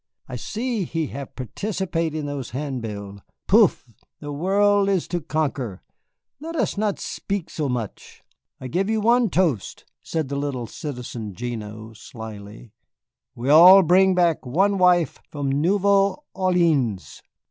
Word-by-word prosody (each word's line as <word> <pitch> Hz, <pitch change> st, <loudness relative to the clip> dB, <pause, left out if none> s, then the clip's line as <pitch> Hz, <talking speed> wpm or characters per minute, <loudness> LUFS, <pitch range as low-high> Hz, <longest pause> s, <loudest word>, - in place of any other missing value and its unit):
I -, -, -6 dB
see 230 Hz, -2 st, -3 dB
he 165 Hz, -1 st, -2 dB
have 140 Hz, -1 st, -8 dB
participate 165 Hz, -, -3 dB
in 155 Hz, -2 st, -3 dB
those 140 Hz, -4 st, -5 dB
handbill. 110 Hz, -8 st, -5 dB, 0.3 s
Poof, -, -, +4 dB, 0.3 s
the 145 Hz, -, -7 dB
world 200 Hz, +6 st, +2 dB
is 190 Hz, -4 st, 0 dB
to 175 Hz, -1 st, -2 dB
conquer, 140 Hz, -, -3 dB, 0.6 s
let 325 Hz, +3 st, -7 dB
us 235 Hz, -9 st, 0 dB
not 205 Hz, -1 st, -1 dB
spik 200 Hz, -4 st, -4 dB
so 150 Hz, -3 st, -2 dB
much." 120 Hz, -5 st, -6 dB, 0.4 s
"I 130 Hz, -, -6 dB
give 185 Hz, +9 st, -1 dB
you 220 Hz, 0 st, +1 dB
one 235 Hz, +1 st, +3 dB
toast," 165 Hz, -, -1 dB, 0.2 s
said 160 Hz, -3 st, -3 dB
the 140 Hz, -, -3 dB
little 140 Hz, -4 st, -3 dB
Citizen 120 Hz, -5 st, -7 dB
Gignoux, 110 Hz, -1 st, -6 dB
slyly, 110 Hz, 0 st, -10 dB, 0.6 s
"we 120 Hz, +3 st, -3 dB
all 180 Hz, +5 st, +9 dB
bring 185 Hz, +3 st, +4 dB
back 170 Hz, -3 st, +2 dB
one 195 Hz, +10 st, +1 dB
wife 180 Hz, -2 st, +3 dB
from 140 Hz, -2 st, -3 dB
Nouvelle 195 Hz, -, +2 dB
Orléans!" 165 Hz, -, 0 dB
155 Hz, 135 wpm, -23 LUFS, 125-190 Hz, 0.6 s, all